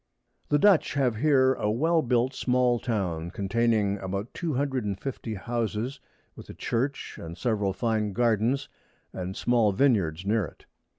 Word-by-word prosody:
_] - - -39
The 145 - +4
Dutch 190 -1 +4
have 125 -5 +1
here 130 0 +4
a 105 - -2
well 160 +9 +2
built 125 0 +1
small 125 -1 +2
Town, 90 -9 -2
containing 105 +1 +1
about 100 +4 -4
two 165 -6 -3
hundred 135 -2 -1
and 100 -2 -3
fifty 120 -5 -5
Houses, 115 +4 -3 0.4
with - - -12
a - - -8
Church, 135 +4 -2
and 85 +1 -8
several 105 -5 0
fine 110 0 -1
Gardens 120 +5 +1 0.5
and 95 +1 -5
small 115 -4 +3
Vineyards 95 - +2
near 110 +1 +2
it. - - -14
115 Hz, 160 wpm, -27 LUFS, 100-130 Hz, 0.5 s, The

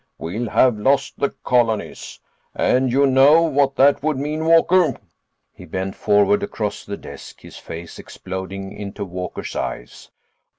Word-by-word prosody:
We'll 105 +8 -4
have 120 -2 +3
lost 135 +6 +1
the 140 - +1
colonies. 115 -3 -1 0.4
And 130 0 +1
you 140 +3 +3
know 140 +5 +5
what 140 -3 +1
that 140 +1 +4
would 155 -1 -1
mean, 150 +3 -3
Walker?" 165 -2 +4 0.6
He - - -13
bent 95 +1 -4
forward 105 - +2
across 110 - -4
the 100 - -6
desk, - - -12
his - - -12
face 85 0 -9
exploding 95 +1 -7
into 100 0 -6
Walker's 90 0 -6
eyes. - - -6
125 Hz, 140 wpm, -20 LUFS, 100-145 Hz, 0.6 s, know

